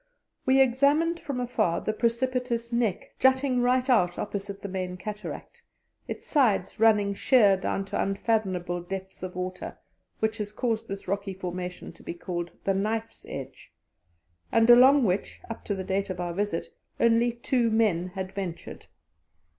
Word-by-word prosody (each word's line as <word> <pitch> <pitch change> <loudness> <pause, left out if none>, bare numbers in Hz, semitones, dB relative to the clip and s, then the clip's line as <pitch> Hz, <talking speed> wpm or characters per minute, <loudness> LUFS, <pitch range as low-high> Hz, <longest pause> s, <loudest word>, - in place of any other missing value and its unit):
We 265 +1 +5
examined 285 +6 +3
from 280 -6 -4
afar 225 -8 0
the 215 - -1
precipitous 235 0 -1
Neck 235 -6 -1
jutting 260 -1 +3
right 250 +1 +2
out 180 -9 +3
opposite 200 -1 -5
the - - -5
main 185 -1 -4
cataract, 210 +3 -7 0.5
its - - -6
sides 225 - +1
running 210 -3 +4
sheer 205 -1 +5
down 195 +1 -2
to - - -2
unfathomable 190 -4 -1
depths 190 +2 -7
of 185 -1 -6
water, 185 0 -5 0.4
which 220 0 -1
has 210 0 -4
caused 225 -1 -1
this 195 0 -6
rocky 200 0 -2
formation 180 -1 -5
to 165 - -18
be - - -6
called 175 -1 -4
"The 195 - +1
Knife's 220 +3 -3
Edge," - - -8 0.8
and 225 0 +4
along 260 +3 +7
which, 190 -2 -1
up 230 - -7
to 205 - -1
the 190 - -4
date 195 +2 -1
of 185 -1 -4
our 175 -1 -2
visit, 200 -2 -2 0.3
only 235 +1 +4
two 240 0 0
men 210 -6 +2
had 190 0 -5
ventured. 185 -4 -6
210 Hz, 155 wpm, -27 LUFS, 185-240 Hz, 0.8 s, along